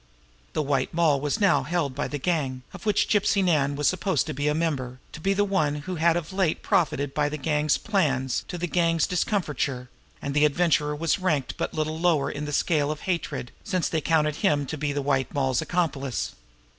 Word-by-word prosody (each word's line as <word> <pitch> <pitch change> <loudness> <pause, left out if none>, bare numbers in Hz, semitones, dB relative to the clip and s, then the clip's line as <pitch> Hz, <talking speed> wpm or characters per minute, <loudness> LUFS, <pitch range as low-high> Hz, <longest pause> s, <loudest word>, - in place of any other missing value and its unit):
The 155 - 0
White 135 +1 -1
Moll 155 -5 +3
was 145 +8 -1
now 185 -9 +4
held 145 -1 -1
by 145 +3 -2
the 145 - -4
gang, 135 -5 -1
of - - -8
which 210 - +3
Gypsy 205 -1 +2
Nan 145 -6 +2
was 145 -1 +1
supposed 185 +1 +1
to 155 - -4
be 145 +2 -1
a 150 - +2
member, 140 -6 -2
to 155 - -9
be 195 +3 +1
the 205 - +3
one 155 -7 +1
who 185 -2 -4
had 165 +1 +3
of 175 +2 -5
late 190 -4 0
profited 150 -8 +1
by 145 -1 +1
the 150 - -4
gang's 150 +1 +1
plans 135 - 0
to 180 - -5
the 175 - -2
gang's 165 -2 +2
discomfiture; 150 - -1 0.3
and 140 - -4
the 150 +1 +3
Adventurer 150 -1 +2
was 165 +5 0
ranked 155 -8 0
but - - -3
little 155 0 -2
lower 165 -5 +2
in 145 +1 -5
the 150 - -4
scale 150 0 +1
of 150 0 -4
hatred, 170 -8 -3
since 185 -2 0
they 160 - -1
counted 150 -1 +1
him 145 -1 +2
to 155 - -4
be 150 -1 -2
the 140 0 -2
White 135 -2 0
Moll's 130 -3 +1
accomplice. 145 -8 -1
150 Hz, 210 wpm, -26 LUFS, 140-175 Hz, 0.3 s, now